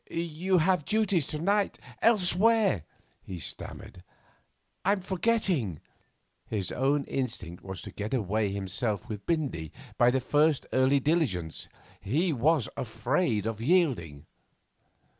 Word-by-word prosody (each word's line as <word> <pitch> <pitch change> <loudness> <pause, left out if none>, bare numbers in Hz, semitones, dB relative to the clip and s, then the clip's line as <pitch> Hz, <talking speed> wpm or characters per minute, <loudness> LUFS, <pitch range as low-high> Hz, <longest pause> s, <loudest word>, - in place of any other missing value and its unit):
'You 170 +3 0
have 180 -1 +2
duties 200 -5 +1
to 150 - -4
night 200 +5 +1 0.2
elsewhere,' 210 - +3 0.4
he 95 - -7
stammered. 90 +2 -7 0.8
'I'm 195 +1 +2
forgetting.' 180 - 0 0.7
His 100 -5 -3
own 140 +2 +1
instinct 110 -11 -4
was 95 -2 -7
to - - -8
get 105 +1 -5
away 110 -4 0
himself 100 +3 -2
with 105 -3 -7
Bindy 140 - -1 0.3
by 120 - +6
the 130 +2 +2
first 150 +3 +2
early 130 +2 +4
diligence. 125 - 0 0.3
He 155 - +1
was 140 0 +2
afraid 115 - 0
of 110 -1 -3
yielding. 120 - +1
135 Hz, 120 wpm, -28 LUFS, 105-175 Hz, 0.8 s, by